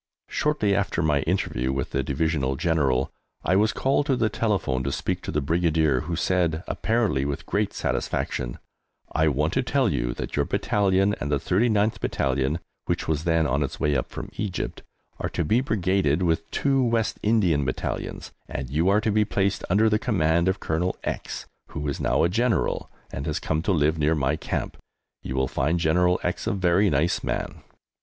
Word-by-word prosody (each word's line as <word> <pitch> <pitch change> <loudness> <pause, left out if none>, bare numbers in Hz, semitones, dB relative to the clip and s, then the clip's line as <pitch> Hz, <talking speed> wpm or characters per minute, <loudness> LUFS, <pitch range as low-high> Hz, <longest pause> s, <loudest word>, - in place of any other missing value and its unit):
Shortly 150 -10 +1
after 95 -4 0
my 75 -2 +2
interview 65 -9 0
with 65 -1 -3
the - - 0
Divisional 70 -2 0
General 70 -5 +1 0.3
I 90 - +2
was 105 +2 +4
called 140 +2 +1
to 135 - +3
the 110 -3 +1
telephone 95 - 0
to 70 - -1
speak - - -2
to - - -5
the 75 - 0
Brigadier, 80 -2 +2
who 85 - -3
said, 85 -2 +1
apparently 110 - 0
with 70 0 -3
great - - 0
satisfaction, - - -2 0.5
"I 80 0 +2
want 75 +2 +1
to - - +2
tell - - +1
you - - -1
that - - -5
your - - +2
Battalion 100 0 +2
and 75 - -3
the 70 - +3
39th 105 - +1
Battalion 65 +3 0 0.3
(which - - -2
was 80 -1 -1
then 80 -1 +3
on 70 0 +1
its 70 - -3
way 75 -1 +1
up 65 - -1
from - - -7
Egypt) 100 -4 -3 0.4
are - - -2
to 85 - -1
be 110 +11 +2
brigaded 95 - +1
with 80 -1 0
two 135 -2 +1
West 115 -2 0
Indian 95 -9 +2
Battalions, 65 -1 -4 0.2
and 65 -1 -5
you 80 +6 +2
are 105 +2 +4
to 110 - +1
be 105 +1 +3
placed 100 -1 0
under 105 +5 +4
the 105 -1 +2
command 85 -8 +2
of 95 +1 +1
Colonel 85 +3 -1
X, - - -4 0.2
who 75 -2 -5
is 70 - -2
now - - +2
a - - +5
General 115 +6 0 0.2
and 70 +3 -4
has 75 - -1
come 80 0 -1
to 90 - 0
live 80 -2 +2
near 75 +2 +3
my 70 0 +1
camp. - - -4 0.4
You 65 - -5
will 65 0 +1
find 80 +7 0
General 90 +3 +3
X - - -2
a - - +1
very 95 +1 +3
nice 75 +3 +1
man." - - -3
85 Hz, 190 wpm, -25 LUFS, 75-100 Hz, 0.5 s, a